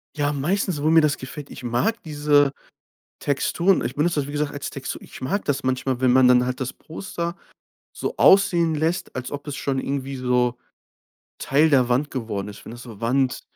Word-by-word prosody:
Ja, 145 0 0
meistens, 170 +2 -1
wo 155 - +2
mir 165 0 +6
das 150 -2 +1
gefällt 135 +2 -8
ich - - -10
mag 205 - 0
diese 145 -2 +3 0.7
Texturen. 170 +6 +1
Ich 120 - -3
benutze 155 +1 +1
das, 140 - -2
wie - - -6
gesagt, 145 0 -1
als 145 -1 -5
Textur. 135 -1 -6
Ich - - -12
mag 145 +11 -2
das 140 -1 -1
manchmal, 130 0 -1
wenn 130 -1 +4
man 130 0 +6
dann 125 0 +5
halt 125 +1 -3
das 130 -1 -3
Poster 170 +1 -6 0.6
so - - -4
aussehen 175 -5 +5
lässt, 165 +4 -1
als 130 -1 -5
ob 145 +1 -6
es 145 - -4
schon 135 -2 -1
irgendwie 135 0 -3
so 125 -1 +1 0.8
Teil 150 +4 +3
der 130 -4 +4
Wand 130 +4 +1
geworden 110 -6 -4
ist, 100 - -11
wenn - - -9
das 120 +1 -10
so 115 -4 -11
Wand 130 +2 0
140 Hz, 200 wpm, -23 LUFS, 125-155 Hz, 0.8 s, mir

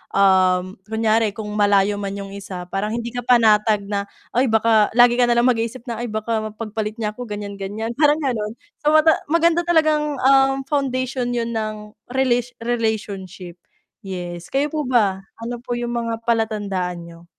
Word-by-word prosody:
um, 185 -1 +3
kunyari 220 -1 +1
kung 210 -1 -6
malayo 205 0 +3
man 200 -1 -4
'yung 200 -1 -7
isa 195 -2 -7
parang 195 +2 -1
hindi 235 0 -4
ka 245 - -4
panatag 215 -3 +4
na, 200 0 -3 0.2
ay, 255 +3 +2
baka 220 -1 +4
lagi 245 0 +5
ka 245 - +4
nalang 235 0 +3
mag-isip 230 +1 -3
na, 235 -3 -5
ay, 240 - -3
baka 220 +1 -2
mapagpalit 215 0 -4
niya 220 -2 -2
ako 245 +3 -8
gan'yan 205 -1 -6
gan'yan 210 +4 -4
parang 295 -1 +5
gano'n. 225 -5 -2 0.2
So, 300 0 +2 0.3
maganda 335 +2 +3
talagang, 305 -4 +2
um, 270 0 +4
foundation 255 -3 -1
'yun 235 0 -2
ng 215 -1 -4 0.2
relation 245 -2 +1
relationship. 205 -6 -3 0.5
Yes, 175 -2 -6
kayo 280 +2 0
po 300 -3 -2
ba 210 -7 +2 0.2
ano 240 +1 -5
po 245 +1 -5
yung 240 0 -3
mga 230 -1 -4
palatandaan 205 -6 -1
niyo? 170 0 -13
225 Hz, 160 wpm, -21 LUFS, 205-245 Hz, 0.5 s, lagi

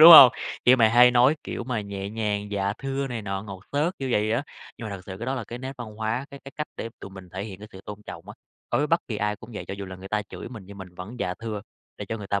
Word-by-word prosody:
đúng 165 +2 +13
hông? 135 -6 +13 0.3
Kiểu 125 +1 +8
mà 115 -3 +6
hay 125 +2 +8
nói, 125 +5 +5
kiểu - - -4
mà, 120 -3 -1
nhẹ 100 -1 -5
nhàng 105 -2 -1
"dạ 100 -1 0
thưa" 135 0 -2
này 120 -4 -3
nọ, 95 -1 -2
ngọt 100 -3 -8
xớt 160 +6 +1
kiểu 135 - -2
vậy 105 +1 +2
á. 120 +5 +2 0.4
Nhưng 110 - -5
mà 100 - -4
thực 90 - -12
sự 95 -1 -6
cái 115 - -4
đó 130 - 0
là 125 -4 -3
cái 120 +3 -7
nét 130 +2 -5
văn 110 -3 -6
hóa, 110 +5 -1
cái 140 - -10
cái 135 - -9
cách 150 - -2
để 115 - -3
tụi 100 - -8
mình 95 -2 -11
thể 95 +2 -3
hiện 100 -3 -7
cái 105 +1 -10
sự 95 - -9
tôn 105 0 -8
trọng - - -8
á, - - -7 0.4
đối - - +3
với 150 - +2
bất 165 +3 +3
kỳ 110 - -2
ai 105 0 0
cũng 110 +4 -12
vậy, - - -4
cho 95 - -3
dù 100 - -5
là 95 - -7
người 95 +1 -9
ta 105 0 +1
chửi 100 - -8
mình 115 -5 -8
nhưng 100 0 -10
mình 90 -2 -9
vẫn 95 +7 -7
"dạ 90 - -1
thưa", 110 -1 -4 0.4
để - - -5
cho 115 - -1
người 100 - -6
ta 100 0 +1
110 Hz, 320 wpm, -26 LUFS, 100-125 Hz, 0.4 s, đúng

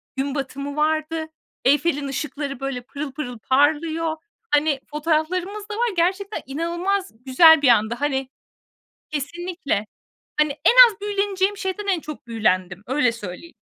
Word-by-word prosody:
gün 275 +1 -2
batımı 280 +1 -4
vardı. 315 +1 0 0.4
Eyfel'in 290 +1 +2
ışıkları, 275 -1 -4
böyle, 270 -2 -3
pırıl 280 +3 -6
pırıl 255 -3 -6
parlıyor. 315 +5 +1 0.3
Hani, 295 -1 +2
fotoğraflarımız 345 +7 -1
da - - -4
var. 475 +2 +1
Gerçekten 385 +4 0
inanılmaz 345 +7 -2
güzel 320 +4 +7
bir 285 - +3
andı. 230 -1 +4
Hani 270 -2 -1 0.8
Kesinlikle. 305 - -3 0.5
Hani, 300 -1 +2
en 300 - +3 0.2
az 430 -2 -10
büyüleneceğim 400 -1 0
şeyden 395 +1 -4
en 380 -4 +1
çok 300 -3 -9
büyülendim. 185 -5 0
Öyle 255 -2 +2
söyleyeyim. 230 - -9
300 Hz, 130 wpm, -22 LUFS, 270-345 Hz, 0.8 s, güzel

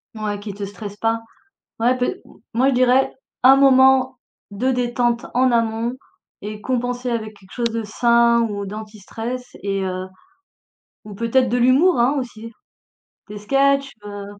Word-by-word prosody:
Ouais, 210 -2 -3
qui 205 0 -7
te 200 +1 -5
stresse 205 0 -9
pas. 225 +1 0 0.6
Ouais 245 +3 +3
pe 250 - 0
m - - -2 0.4
moi, 255 +4 +3
je - - +1
dirais 255 +1 +3 0.3
un 265 +2 +8
moment 265 -1 +5 0.3
de 250 +6 0
détente 240 -1 0
en 255 +1 +3
amont 230 0 0 0.5
et 210 +1 -7
compenser 245 0 -2
avec 220 -2 -4
quelque 190 -1 -21
chose 235 -1 -1
de 230 0 -3
sain 235 +2 +3
ou 200 -1 -4
d'anti-stress 220 +4 -7
et 195 -1 -1
heu 185 0 -4 1.0
ou 210 -1 -10
peut-être 230 +4 +1
de 245 - 0
l'humour, 260 +8 +4
hein, 255 +5 +3
aussi. 230 -3 -7 0.8
Des 210 0 -7
sketchs, 275 +5 +1
heu. 205 -1 -7
235 Hz, 155 wpm, -20 LUFS, 210-255 Hz, 1.0 s, un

